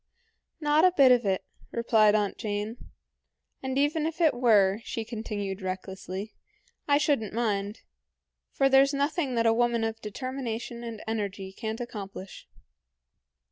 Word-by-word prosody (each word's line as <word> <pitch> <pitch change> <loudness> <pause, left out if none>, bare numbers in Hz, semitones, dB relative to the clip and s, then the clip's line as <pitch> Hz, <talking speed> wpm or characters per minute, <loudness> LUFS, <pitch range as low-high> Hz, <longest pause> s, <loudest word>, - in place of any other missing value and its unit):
"Not 300 0 +3
a 365 - +6
bit 270 -3 +7
of 245 -4 +4
it," 190 -1 0 0.3
replied 220 -3 +4
Aunt 205 -2 0
Jane. 210 +1 -3 0.8
"And 265 0 -3
even 300 +2 +2
if 325 +1 -6
it 325 -3 +4
were," 215 -4 +3
she 225 -2 -4
continued 210 -4 -4
recklessly, 190 +2 -5 0.5
"I 285 -1 +5
should 295 -4 +2
n't 210 -3 -6
mind, 210 -2 -1 0.7
for 270 - +3
there's 270 +1 +5
nothing 285 -1 0
that 230 0 +2
a 225 - +5
woman 235 0 +1
of 225 0 -3
determination 240 0 -5
and 230 -2 -7
energy 200 -3 -4
can't 220 +1 -4
accomplish." 200 -5 -8
225 Hz, 140 wpm, -28 LUFS, 205-265 Hz, 0.8 s, bit